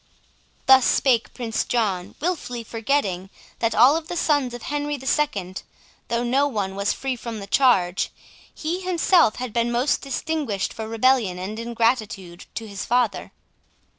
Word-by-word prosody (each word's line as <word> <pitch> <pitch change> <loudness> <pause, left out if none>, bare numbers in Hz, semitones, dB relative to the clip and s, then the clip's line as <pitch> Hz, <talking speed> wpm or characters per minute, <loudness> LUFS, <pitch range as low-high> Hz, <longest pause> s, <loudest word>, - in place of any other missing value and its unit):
Thus 265 -1 +7
spake 245 -4 +2
Prince 225 -3 -2
John, 195 -7 -1
wilfully 290 -8 -3
forgetting, 220 -6 -1 0.3
that 230 -1 0
of - - 0
all 290 +6 +6
the 350 +2 -6
sons 290 -6 +1
of 240 - -9
Henry 290 0 -2
the 265 - -11
Second, 200 - -1 0.5
though 235 +1 0
no 265 +4 +2
one 200 -7 -3
was 200 +1 0
free 270 -1 -2
from 230 -2 -6
the 200 - -7
charge, 195 -5 +3 0.4
he 330 +4 -3
himself 360 - +3
had 250 -3 -5
been 235 0 +1
most 245 +4 +1
distinguished 275 -7 -2
for 220 -1 -6
rebellion 225 -4 +2
and 200 +5 -5
ingratitude 230 -6 -1
to 225 - -5
his 200 -2 -6
father. 245 -3 0
235 Hz, 155 wpm, -23 LUFS, 210-275 Hz, 0.5 s, Thus